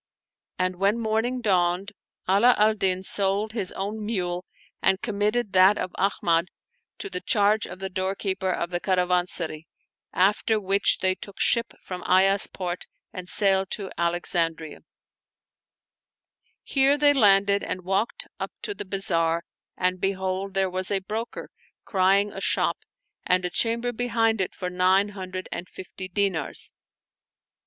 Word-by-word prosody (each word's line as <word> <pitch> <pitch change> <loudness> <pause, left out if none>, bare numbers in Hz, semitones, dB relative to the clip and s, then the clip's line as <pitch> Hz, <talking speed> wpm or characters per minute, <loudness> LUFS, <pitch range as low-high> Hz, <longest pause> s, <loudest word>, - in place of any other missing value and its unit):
And 185 0 -1
when 200 +4 +2
morning 230 +3 -1
dawned, 185 -1 +1 0.4
Ala 205 +7 +5
al 215 +1 +4
Din 190 -3 0
sold 200 +2 +1
his 210 -5 -2
own 210 +3 -4
mule 180 -5 -2 0.4
and 190 0 +3
committed 210 0 -1
that 190 +2 +6
of 185 - -3
Ahmad 175 -3 +1 0.5
to - - -5
the 365 -2 -5
charge 210 - +2
of 180 - -9
the 190 +1 -4
door 190 +1 -2
keeper 190 -1 -2
of 175 0 -3
the 175 - -1
caravansary, 180 -4 0 0.4
after 210 +3 +2
which 200 0 +2
they 185 0 +4
took 200 +1 -11
ship 235 -1 +1
from 180 -1 -6
Ayas 195 +2 +4
port 180 -1 -5 0.3
and 180 -1 -7
sailed 195 -2 +3
to 195 -3 -3
Alexandria. 170 -2 -1 1.8
Here 275 +1 +3
they 290 0 +5
landed 200 -5 +4
and 185 - -4
walked 200 - -1
up - - -5
to 415 - -2
the 300 - -7
bazaar 170 -4 0 0.3
and 185 0 0
behold, 190 0 -2
there 195 0 +2
was 185 0 -2
a 200 - +1
broker 215 +4 -5 0.3
crying 195 +1 +2
a 195 - -7
shop - - +1 0.4
and 180 0 +1
a 180 - -2
chamber 235 +4 0
behind 225 -3 0
it 185 - -3
for 180 - -4
nine 185 +3 +3
hundred 185 -2 -7
and 180 - -5
fifty 185 0 -8
dinars. 185 -5 -1
195 Hz, 145 wpm, -25 LUFS, 185-210 Hz, 1.8 s, that